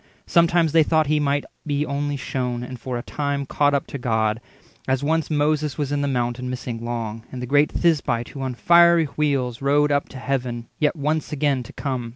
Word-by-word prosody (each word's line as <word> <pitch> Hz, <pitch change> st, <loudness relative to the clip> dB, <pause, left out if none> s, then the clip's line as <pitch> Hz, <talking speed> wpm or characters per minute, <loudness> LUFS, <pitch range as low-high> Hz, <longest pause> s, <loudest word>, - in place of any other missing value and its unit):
Sometimes 170 Hz, -2 st, +3 dB
they 165 Hz, +1 st, +5 dB
thought 155 Hz, 0 st, +3 dB
he 150 Hz, +1 st, +1 dB
might 145 Hz, 0 st, 0 dB, 0.2 s
be 145 Hz, 0 st, -1 dB
only 145 Hz, 0 st, -2 dB
shewn, 125 Hz, -2 st, -3 dB
And 125 Hz, 0 st, -7 dB
for 125 Hz, +1 st, -4 dB
a 120 Hz, -, -5 dB
time 140 Hz, -1 st, -2 dB
caught 145 Hz, +1 st, +2 dB
up 140 Hz, -, 0 dB
to 140 Hz, -, -7 dB
God, 110 Hz, -2 st, 0 dB, 0.5 s
as 130 Hz, +1 st, 0 dB
once 160 Hz, +2 st, 0 dB
Moses 150 Hz, -1 st, 0 dB
was 145 Hz, -2 st, -2 dB
in 145 Hz, 0 st, 0 dB
the 140 Hz, -, 0 dB
Mount 120 Hz, -2 st, -1 dB
and 125 Hz, 0 st, -4 dB
missing 125 Hz, -2 st, -5 dB
long, 115 Hz, -2 st, -4 dB
And 130 Hz, -, -6 dB
the 125 Hz, -, -4 dB
great 145 Hz, +4 st, +3 dB
Thisbite, 135 Hz, -8 st, +1 dB
who 135 Hz, -, -8 dB
on 130 Hz, -2 st, -3 dB
fiery 170 Hz, +2 st, +5 dB
wheels 140 Hz, -5 st, -1 dB
Rode 145 Hz, +2 st, +3 dB
up 140 Hz, 0 st, 0 dB
to 135 Hz, -, -10 dB
Heaven, 125 Hz, -3 st, -3 dB
yet 150 Hz, -1 st, +2 dB
once 155 Hz, +1 st, -1 dB
again 145 Hz, -3 st, +1 dB
to 120 Hz, -, -11 dB
come. 130 Hz, -4 st, -3 dB
140 Hz, 210 wpm, -23 LUFS, 125-150 Hz, 0.5 s, they